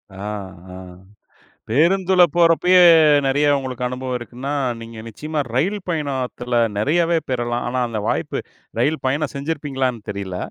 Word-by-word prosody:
அ -, -, -12 dB, 0.6 s
அ. -, -, -8 dB, 0.9 s
பேருந்துல 180 Hz, -, +3 dB
போறப்பயே 175 Hz, +2 st, +5 dB, 0.4 s
நெறைய 145 Hz, +2 st, +2 dB
உங்களுக்கு 130 Hz, -2 st, -5 dB
அனுபவம் 125 Hz, 0 st, -4 dB
இருக்குன்னா, 125 Hz, +4 st, -6 dB, 0.3 s
நீங்க 115 Hz, 0 st, -10 dB
நிச்சயமா 150 Hz, +7 st, -5 dB, 0.2 s
ரயில் 195 Hz, +10 st, +1 dB
பயணத்துல 130 Hz, -6 st, -1 dB, 0.2 s
நெறையவே 165 Hz, +9 st, +2 dB
பெறலாம். 120 Hz, -1 st, -1 dB
ஆனா, 130 Hz, +1 st, -1 dB
அந்த 115 Hz, -2 st, -4 dB
வாய்ப்பு -, -, -1 dB, 0.4 s
ரயில் 155 Hz, +2 st, 0 dB
பயணம் 145 Hz, +2 st, -1 dB
செஞ்சிருப்பீங்களான்னு 140 Hz, -5 st, -2 dB
தெரியல. 100 Hz, -2 st, -5 dB
135 Hz, 120 wpm, -20 LUFS, 120-160 Hz, 0.9 s, போறப்பயே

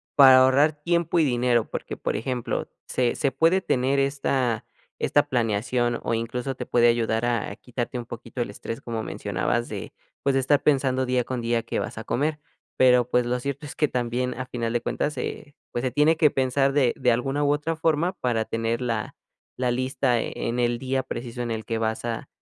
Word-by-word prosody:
para 130 Hz, -2 st, +9 dB
ahorrar 135 Hz, +4 st, +5 dB
tiempo 170 Hz, 0 st, +1 dB
y -, -, +5 dB
dinero?, 120 Hz, -3 st, +1 dB
porque -, -, -5 dB
por -, -, -2 dB
ejemplo 125 Hz, +1 st, -3 dB, 0.2 s
se 125 Hz, -2 st, 0 dB
se 140 Hz, -, 0 dB
puede 165 Hz, +8 st, +3 dB
tener 135 Hz, -3 st, +1 dB
esta 135 Hz, -4 st, 0 dB, 0.3 s
esta 145 Hz, 0 st, +2 dB
planeación 120 Hz, +1 st, 0 dB
o -, -, -1 dB
incluso 125 Hz, +3 st, -3 dB
te -, -, -5 dB
puede 120 Hz, -1 st, +4 dB
ayudar 115 Hz, 0 st, +1 dB
a 115 Hz, -4 st, -1 dB
quitarte 125 Hz, 0 st, -4 dB
un 120 Hz, -, -6 dB
poquito 120 Hz, +1 st, -7 dB
el 120 Hz, -, -2 dB
estrés, 115 Hz, +5 st, -6 dB
como 115 Hz, -2 st, -4 dB
mencionabas, 105 Hz, +5 st, -2 dB
de, 105 Hz, -3 st, -6 dB, 0.3 s
pues, 140 Hz, -1 st, +2 dB
estar 135 Hz, +1 st, +2 dB
pensando 130 Hz, -2 st, +2 dB
día 125 Hz, -1 st, +1 dB
con 130 Hz, -1 st, -3 dB
día 115 Hz, 0 st, +1 dB
qué 115 Hz, -, -3 dB
vas -, -, -4 dB
a -, -, -6 dB
comer, 150 Hz, +3 st, -1 dB, 0.4 s
pero, 125 Hz, -2 st, +5 dB
pues, 125 Hz, -1 st, +2 dB
lo 125 Hz, +1 st, 0 dB
cierto 140 Hz, +3 st, -4 dB
es -, -, -9 dB
que 150 Hz, -, +2 dB
también 125 Hz, +1 st, -1 dB
a 130 Hz, -, -4 dB
final 115 Hz, -1 st, -3 dB
de 120 Hz, -, +1 dB
cuentas 150 Hz, +4 st, -1 dB
se 145 Hz, -, -5 dB, 0.2 s
pues, 120 Hz, -, -2 dB
se 130 Hz, -, 0 dB
tiene 150 Hz, +5 st, +3 dB
que 150 Hz, -3 st, +4 dB
pensar 135 Hz, +1 st, +1 dB
de 130 Hz, -4 st, +3 dB
de 125 Hz, -, +3 dB
alguna 135 Hz, +5 st, 0 dB
u 145 Hz, -, +3 dB
otra 150 Hz, +3 st, -2 dB
forma 160 Hz, +3 st, +1 dB
para 120 Hz, -9 st, 0 dB
tener 115 Hz, +2 st, -2 dB
la 115 Hz, -4 st, -2 dB, 0.4 s
la 125 Hz, -1 st, +1 dB
lista 130 Hz, -1 st, +1 dB
e -, -, -4 dB, 0.2 s
en 120 Hz, +1 st, -2 dB
el 120 Hz, 0 st, +1 dB
día 130 Hz, 0 st, -1 dB
preciso 120 Hz, -1 st, -6 dB
en 120 Hz, -, -3 dB
el 110 Hz, -1 st, -3 dB
que 115 Hz, -, -2 dB
vas 110 Hz, 0 st, -1 dB
a 115 Hz, -1 st, -3 dB
125 Hz, 205 wpm, -25 LUFS, 120-135 Hz, 0.4 s, para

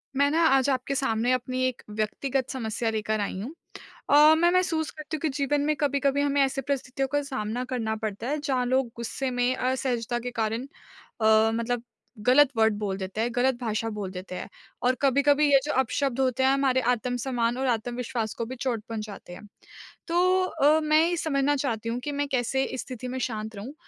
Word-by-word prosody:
मैं 285 Hz, +1 st, +3 dB
ना 330 Hz, +2 st, +2 dB
आज 270 Hz, -1 st, +3 dB
आपके 265 Hz, +1 st, -1 dB
सामने 240 Hz, -2 st, +1 dB
अपनी 255 Hz, +1 st, -2 dB
एक 255 Hz, -, -5 dB
व्यक्तिगत 240 Hz, +5 st, -2 dB
समस्या 230 Hz, -2 st, -2 dB
लेकर 215 Hz, 0 st, -1 dB
आई 200 Hz, -2 st, -3 dB
हूँ। 250 Hz, +9 st, -6 dB, 0.6 s
अ, 300 Hz, +2 st, +7 dB
मैं 345 Hz, +2 st, +4 dB
महसूस 340 Hz, -4 st, +1 dB
करती 310 Hz, 0 st, -6 dB
हूँ -, -, -13 dB
कि 315 Hz, -, +1 dB
जीवन 285 Hz, 0 st, +1 dB
में 305 Hz, 0 st, +1 dB
कभी-कभी 280 Hz, -1 st, +1 dB
हमें 285 Hz, 0 st, +2 dB
ऐसी 270 Hz, 0 st, -1 dB
परिस्थितियों 270 Hz, 0 st, -2 dB
का 290 Hz, -, +2 dB
सामना 250 Hz, -3 st, -3 dB
करना 220 Hz, -3 st, -1 dB
पड़ता 215 Hz, +1 st, -4 dB
है 300 Hz, -, 0 dB
जहाँ 265 Hz, -3 st, 0 dB
लोग 260 Hz, +1 st, +1 dB
गुस्से 255 Hz, +3 st, -3 dB
में, 245 Hz, +1 st, +1 dB
असहजता 250 Hz, -2 st, -1 dB
के 245 Hz, +1 st, -5 dB
कारण 225 Hz, +2 st, -2 dB, 0.5 s
अ, -, -, +2 dB, 0.3 s
मतलब 235 Hz, +1 st, -2 dB, 0.4 s
गलत 270 Hz, +2 st, +6 dB
वर्ड 220 Hz, -1 st, +4 dB
बोल 200 Hz, -2 st, -2 dB
देते 195 Hz, +2 st, -4 dB
हैं, 235 Hz, -, +1 dB
गलत 255 Hz, +1 st, +2 dB
भाषा 225 Hz, -1 st, -1 dB
बोल 195 Hz, -3 st, -4 dB
देते 185 Hz, 0 st, -7 dB
हैं। -, -, -6 dB, 0.3 s
और 250 Hz, +1 st, +3 dB
कभी-कभी 280 Hz, +2 st, +4 dB
ये 275 Hz, -, +7 dB
जो 300 Hz, -, -1 dB
अपशब्द 265 Hz, +1 st, -1 dB
होते 260 Hz, -1 st, +1 dB
हैं 265 Hz, -, +5 dB
हमारे 270 Hz, -1 st, +2 dB
आत्म-सम्मान 245 Hz, 0 st, -1 dB
और 265 Hz, 0 st, -1 dB
आत्मविश्वास 240 Hz, -1 st, -2 dB
को 230 Hz, -, -3 dB
भी 255 Hz, -, -6 dB
चोट 240 Hz, -4 st, -2 dB
पहुँचाते 215 Hz, -5 st, -7 dB
हैं। 205 Hz, +4 st, -11 dB, 0.6 s
तो 365 Hz, +2 st, +3 dB
अ, 305 Hz, -1 st, +3 dB
मैं 305 Hz, +1 st, +4 dB
ये 350 Hz, -, 0 dB
समझना 290 Hz, -3 st, +1 dB
चाहती 230 Hz, -5 st, -2 dB
हूँ 235 Hz, +1 st, -2 dB
कि 295 Hz, -, -2 dB
मैं 285 Hz, 0 st, -1 dB
कैसे 265 Hz, +1 st, 0 dB
इस 260 Hz, -, -4 dB
स्थिति 255 Hz, -1 st, -7 dB
में -, -, -3 dB
शांत 220 Hz, -3 st, -4 dB
रहूँ 215 Hz, +8 st, -7 dB
255 Hz, 200 wpm, -26 LUFS, 230-280 Hz, 0.6 s, अ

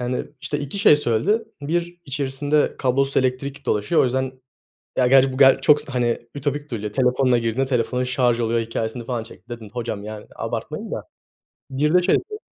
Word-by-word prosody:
Yani, 125 Hz, +1 st, -2 dB
işte, 145 Hz, -, -2 dB
2 145 Hz, +7 st, -5 dB
şey 150 Hz, -, +7 dB
söyledi. 150 Hz, -, +1 dB, 0.2 s
Bir, 175 Hz, +4 st, -2 dB
içerisinde 145 Hz, +1 st, 0 dB
kablosuz 135 Hz, +1 st, +1 dB
elektrik 135 Hz, +2 st, -1 dB
dolaşıyor, 105 Hz, +10 st, +2 dB
o -, -, +4 dB
yüzden 130 Hz, +1 st, -1 dB, 0.7 s
Ya, 125 Hz, -, +4 dB
gerçi 135 Hz, +1 st, +5 dB
bu 130 Hz, -, -5 dB
ger 135 Hz, -1 st, +6 dB
çok 150 Hz, +2 st, +5 dB
se 135 Hz, -, -9 dB
hani, 120 Hz, -2 st, +1 dB, 0.2 s
ütopik 145 Hz, +1 st, -3 dB
duyuluyor. 105 Hz, -3 st, -4 dB
Telefonunla 125 Hz, 0 st, +3 dB
girdin, 115 Hz, +3 st, 0 dB
telefonun 125 Hz, 0 st, 0 dB
şarj 125 Hz, -2 st, +1 dB
oluyor 115 Hz, 0 st, +1 dB
hikâyesini 115 Hz, +1 st, -3 dB
falan 120 Hz, -2 st, -3 dB
çekti. 115 Hz, 0 st, -16 dB
Dedim, 120 Hz, -3 st, -8 dB
"Hocam, 115 Hz, -4 st, -4 dB
yani, 105 Hz, 0 st, -8 dB
abartmayın -, -, -4 dB
da." -, -, -4 dB, 0.7 s
Bir 150 Hz, +4 st, +1 dB
de 180 Hz, 0 st, +5 dB
şey 185 Hz, -, +4 dB
dedi 425 Hz, +3 st, -4 dB
130 Hz, 180 wpm, -22 LUFS, 120-145 Hz, 0.7 s, şey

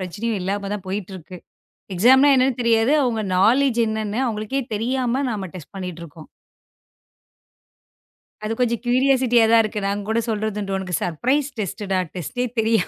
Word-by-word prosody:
பிரச்சனையும் 205 Hz, +4 st, -3 dB
இல்லாமதான் 200 Hz, +1 st, -3 dB
போயிட்டு 195 Hz, 0 st, -4 dB
இருக்கு. 180 Hz, +1 st, -11 dB, 0.6 s
எக்ஸாம் 255 Hz, +9 st, +5 dB
என்னன்னே 260 Hz, 0 st, +3 dB
தெரியாது. 230 Hz, +2 st, +3 dB
அவங்க 230 Hz, -3 st, -1 dB
நாலேட்ஜ் 240 Hz, +5 st, +3 dB
என்னன்னு 220 Hz, +1 st, -2 dB
அவங்களுக்கே 220 Hz, +4 st, -2 dB
தெரியாம 250 Hz, +3 st, -1 dB
நாம 200 Hz, -4 st, -4 dB
டெஸ்ட் 180 Hz, +1 st, -11 dB
பண்ணிட்டு 180 Hz, -3 st, -6 dB
இருக்கோம். 155 Hz, 0 st, -13 dB, 2.2 s
அது 215 Hz, -, -2 dB
கொஞ்சம் 235 Hz, -2 st, +1 dB
கியூரியாசிட்டி 255 Hz, 0 st, +2 dB, 0.2 s
தான் 230 Hz, -1 st, +6 dB
இருக்கு. 215 Hz, 0 st, -3 dB
நாங்க 200 Hz, +1 st, -2 dB
கூடச் 230 Hz, +2 st, -1 dB
சொல்றது 210 Hz, -2 st, -2 dB
உனக்கு 185 Hz, -2 st, -5 dB
சர்ப்ரைஸ் 260 Hz, -, 0 dB
டெஸ்டுடா, 195 Hz, 0 st, -2 dB, 0.2 s
டேஸ்ட்டே 220 Hz, -, -3 dB
தெரியா 225 Hz, -2 st, +3 dB
220 Hz, 135 wpm, -21 LUFS, 195-245 Hz, 2.2 s, தான்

